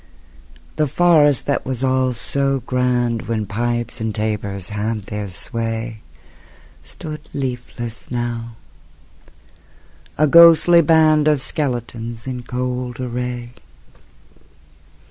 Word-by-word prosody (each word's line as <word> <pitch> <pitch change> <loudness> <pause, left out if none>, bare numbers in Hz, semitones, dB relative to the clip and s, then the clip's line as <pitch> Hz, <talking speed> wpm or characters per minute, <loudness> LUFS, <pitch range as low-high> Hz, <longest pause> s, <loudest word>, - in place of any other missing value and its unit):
The 155 - +2
forest 150 -3 +4
that 140 - 0
was 130 -1 -4
all 130 -1 +2
so 135 +3 -1
grand 125 -2 0
When 110 -1 -1
pipes 120 +2 -2
and 110 -1 -2
tabors 100 -3 -3
had 105 +1 -3
their 105 +1 -5
sway 115 +2 -4 0.8
Stood 155 0 -9
leafless 125 -3 -5
now, 120 -1 -4 1.6
a 155 - +4
ghostly 170 +2 +7
band 155 -1 +4
Of 150 -2 +3
skeletons 120 -5 -3
in 125 -2 -4
cold 125 0 -4
array. 125 -1 -4
125 Hz, 100 wpm, -20 LUFS, 115-135 Hz, 1.6 s, ghostly